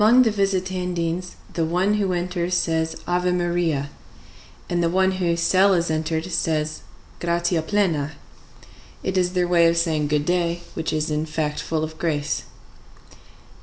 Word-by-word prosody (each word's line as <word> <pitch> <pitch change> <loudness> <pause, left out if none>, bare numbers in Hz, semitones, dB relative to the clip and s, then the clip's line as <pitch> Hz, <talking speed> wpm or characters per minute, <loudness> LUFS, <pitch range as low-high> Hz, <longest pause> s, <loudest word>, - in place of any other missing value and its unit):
Among 240 +4 +7
the 225 - +2
Visitandines 185 -3 -1 0.2
the 165 - 0
one 180 +5 +1
who 200 -3 +1
enters 175 0 -1
says: 160 -2 0
"Ave 180 0 +1
Maria," 170 -5 0 0.8
and 175 -1 0
the 170 - +2
one 190 +2 +3
whose 175 -3 0
cell 190 +3 +4
is 170 -2 0
entered 160 +1 -1
says, 155 -2 -1 0.4
"Gratia 170 0 +1
plena." 160 -5 0 0.9
It 190 - -2
is 180 -1 +1
their 180 -1 +1
way 170 -1 +5
of 165 0 +2
saying 160 -3 +1
good 150 0 +1
day, 175 0 0
which 160 - -2
is 155 0 -1
in 150 +1 -1
fact 150 -1 -2
full 160 -1 -2
of 155 0 -6
grace. 155 -3 -1
170 Hz, 155 wpm, -23 LUFS, 160-180 Hz, 0.9 s, Among